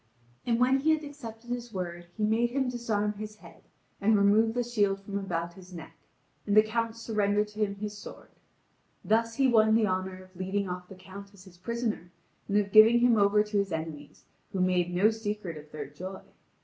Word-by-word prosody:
And 230 -1 +2
when 260 +2 +4
he 315 +3 +3
had 310 - -8
accepted 240 -5 -9
his 240 -1 -4
word 175 -3 -5
he 215 - -2
made 225 +3 +2
him 265 +1 0
disarm 220 -4 -1
his 210 +1 -8
head - - -16 0.4
and 215 +1 +4
remove 215 +3 +4
the 245 - +1
shield 205 -5 +1
from 200 0 -4
about 170 -3 -3
his 185 0 -14
neck, 165 0 -10 0.5
and 205 +1 +2
the 215 - +9
Count 230 +1 -2
surrendered 210 -2 0
to 210 +1 -12
him 205 -2 0
his 210 +1 -5
sword. 205 - -11 0.8
Thus 230 +1 +1
he 270 +1 +3
won 220 -3 +5
the 225 -1 +4
honour 185 -1 -3
of 185 0 -21
leading 190 +2 -2
off 180 0 -6
the 195 - -10
Count 195 +2 -12
as 185 - -15
his 180 -2 -17
prisoner, 225 -4 -3 0.4
and 205 - +1
of 200 -1 +1
giving 225 +3 +7
him 245 -1 +5
over 210 0 +4
to 210 0 -3
his 200 -1 -1
enemies, 160 -2 -6 0.3
who 190 - -2
make 180 -1 +2
no 185 +5 +3
secret 210 -5 -4
of 150 0 -12
their 150 -2 -5
joy. 185 +7 -8
210 Hz, 205 wpm, -29 LUFS, 185-225 Hz, 0.8 s, the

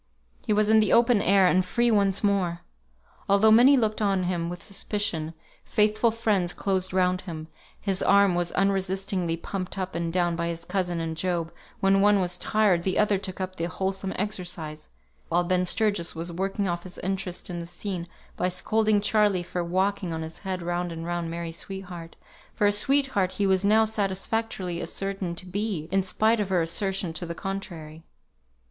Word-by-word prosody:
He - - +1
was 210 0 +3
in 220 - +6
the 215 -2 +2
open 235 -3 +5
air, 195 -1 +5
and 185 +1 +4
free 235 +6 +1
once 200 -2 +2
more! 190 -4 +1 0.7
Although 200 +2 +5
many 250 +5 +7
looked 220 -3 0
on 195 -3 +1
him 175 -2 -1
with 175 0 -7
suspicion, 195 -6 -3 0.3
faithful 215 +2 +2
friends 210 -6 0
closed 190 -1 -1
round 185 0 +1
him; 160 -3 -7 0.3
his 195 -2 -2
arm 200 -1 +5
was 175 -1 0
unresistingly 190 -2 0
pumped 185 +2 -5
up 185 -1 -3
and 170 -1 -2
down 175 -1 +1
by 170 0 -2
his 170 0 -4
cousin 175 -3 -1
and 165 -1 -3
Job; 170 -1 -2 0.3
when 195 0 +4
one 205 0 +5
was 180 -1 -1
tired, 210 -5 +2
the 185 +2 -1
other 210 -2 +3
took 185 -1 -6
up 185 0 -4
the 165 - -1
wholesome 190 +2 -3
exercise, 175 -6 -4 0.4
while 175 +1 +2
Ben 180 0 +1
Sturgis 205 -4 0
was 165 +2 -4
working 195 +3 -2
off 175 -1 -2
his 180 0 -10
interest 190 -1 -3
in 175 - -4
the 170 - -6
scene 175 0 -5 0.3
by 180 - 0
scolding 215 +3 +1
Charley 210 -3 +2
for 175 0 -3
walking 185 +1 0
on 160 0 -3
his 160 +1 -9
head 185 -3 -4
round 175 0 -2
and 165 0 -6
round 175 -1 -2
Mary's 170 0 -5
sweetheart, 180 -4 -8 0.4
for 210 - +1
a 205 - +5
sweetheart 235 -4 +1
he 205 - 0
was 190 0 +3
now 215 +2 +5
satisfactorily 195 -3 -2
ascertained 195 -3 -3
to 185 - -3
be, 185 -4 -3
in 195 0 +3
spite 220 +4 +2
of 205 -2 -1
her 185 -2 +2
assertion 185 +1 -1
to 170 +2 -4
the 170 - -5
contrary. 170 -6 -6
185 Hz, 185 wpm, -26 LUFS, 175-200 Hz, 0.7 s, many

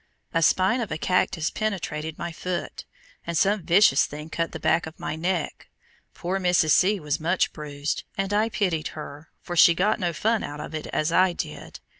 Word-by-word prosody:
A 165 - +2
spine 190 +8 +3
of 225 - -4
a 155 - -2
cactus 170 -2 0
penetrated 160 -7 -3
my 170 0 -4
foot, 180 +2 -5 0.4
and 170 -1 -1
some 200 +3 +2
vicious 175 -4 +4
thing 150 +2 -9
cut 165 0 -2
the - - -6
back 160 0 +1
of 160 - -11
my - - -3
neck. 170 0 -3 0.5
Poor 185 +3 -2
Mrs. 180 -4 +3
C. 200 +6 +4
was 150 0 -2
much 175 +4 +1
bruised, 145 -1 -4
and 195 +1 -1
I 215 +2 +2
pitied 180 -9 -1
her, 150 +1 -9
for 175 - -5
she 170 0 +7
got 195 +5 +1
no 175 -1 0
fun 220 +7 0
out 145 0 -6
of 150 - -7
it 155 - -5
as 155 +2 -1
I 185 +1 +4
did. - - -7
170 Hz, 195 wpm, -25 LUFS, 155-190 Hz, 0.5 s, she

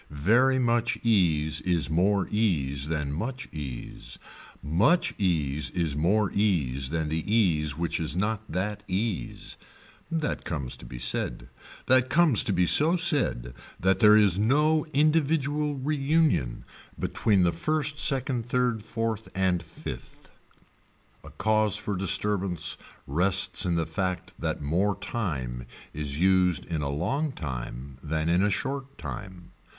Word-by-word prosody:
Very 115 - +3
much 120 -2 +1
ease 85 -9 +2
is 85 -4 0
more 95 +4 +2
ease 75 -10 0
than 75 -3 -2
much 125 - -4
ease, 70 -6 -7 0.5
much 100 - +2
ease 75 -8 0
is 80 -1 -2
more 95 +7 +1
ease 70 -11 0
than 80 -1 -2
the 80 0 -2
ease 80 -10 +2
which 85 0 -1
is 80 +1 -2
not 105 +2 0
that 100 +4 -2
ease. 95 - -3 0.5
That 160 -3 -2
comes 70 -6 -4
to - - -12
be - - -8
said. - - -2 0.4
That 130 0 +3
comes 155 -4 +4
to - - 0
be 90 -1 +2
so 155 - +4
said 145 - +1 0.3
that 95 +1 +2
there 105 -2 +7
is 100 -3 +5
no 150 +8 +2
individual 150 -1 +1
reunion 140 - 0 0.3
between 100 -4 +1
the 85 - +3
first 150 - -1
second 130 -4 0
third 125 -3 +1
fourth 115 -1 -3
and 95 -2 +1
fifth. - - -10 0.9
A - - -11
cause 110 -2 +1
for 105 - -3
disturbance 95 -3 0 0.3
rests 90 +5 +2
in 85 - +1
the 85 -1 0
fact 90 +3 -3
that - - -3
more 90 +7 0
time 70 - -4 0.3
is 75 0 -4
used 90 -2 +3
in 80 -3 -3
a 70 - -2
long 130 - -1
time 65 - -6
than 80 +2 -2
in 85 +2 +3
a 105 - +3
short 135 +7 -4
time. 95 -4 -8
95 Hz, 140 wpm, -27 LUFS, 80-120 Hz, 0.9 s, there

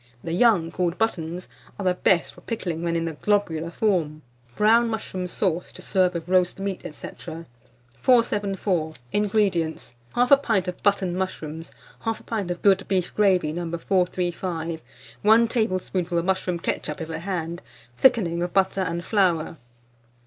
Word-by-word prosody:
The 165 - -3
young, 180 -5 +3
called 180 -1 -1
buttons, 180 -5 -2 0.3
are 200 - -5
the 180 - +4
best 180 -1 +2
for - - -16
pickling 175 -8 -4
when 170 0 -1
in 165 0 0
the 165 - -2
globular 170 -3 0
form. 170 -6 0 0.3
BROWN 230 +2 +4
MUSHROOM 190 -4 -3
SAUCE, 180 -1 -1
to - - -11
serve 185 -2 +2
with 165 0 -4
Roast 180 0 +2
Meat, 195 -1 -3
&c. - - -7 0.9
474. 200 -8 +2 0.2
INGREDIENTS. 195 - 0 0.2
1/2 250 +3 +5
pint 210 -8 +1
of 180 - -5
button 195 -3 +1
mushrooms, 165 -4 -4 0.3
1/2 225 -1 -2
pint 210 -6 -3
of 175 - -4
good 195 -1 +4
beef 185 -2 0
gravy, 185 -7 +3
No. 175 +1 -3
435, 175 -2 -1 0.4
1 225 +2 +6
tablespoonful 185 -6 -1
of 170 - 0
mushroom 185 -2 0
ketchup 155 -2 -3
(if 165 -1 -5
at 160 0 -4
hand), 175 -2 -3 0.3
thickening 175 - +3
of 175 0 -2
butter 195 0 +2
and 170 -1 -2
flour. 175 -6 +1
180 Hz, 150 wpm, -24 LUFS, 170-200 Hz, 0.9 s, 1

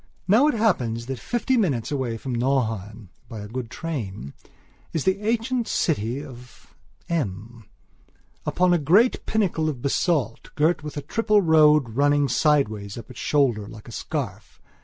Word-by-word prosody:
Now 225 +10 +5
it 300 - +1
happens 125 - 0
that 130 -1 -5
fifty 245 +2 0
minutes 145 - 0
away 130 -5 -2
from 130 +3 -5
Nauheim, 115 -5 -1 0.2
by 110 -4 -7
a 105 - -7
good 120 +1 -5
train, 110 - -5 0.6
is 160 - -1
the 190 +2 +1
ancient 230 +2 0
city 135 -2 -1
of 125 -2 -14 0.3
M, 115 - -4 0.8
upon 180 0 +2
a 175 - +3
great 190 - +3
pinnacle 180 -7 +1
of 130 -5 -6
basalt, 140 -4 0
girt 155 +3 +2
with 150 0 -7
a 145 - -4
triple 210 +5 +2
road 150 -5 +5
running 145 +4 +2
sideways 110 -9 +1
up 120 +3 -9
its 125 - -11
shoulder 125 -8 +1
like 110 +1 -12
a - - -9
scarf. 115 - -5
140 Hz, 155 wpm, -24 LUFS, 115-170 Hz, 0.8 s, Now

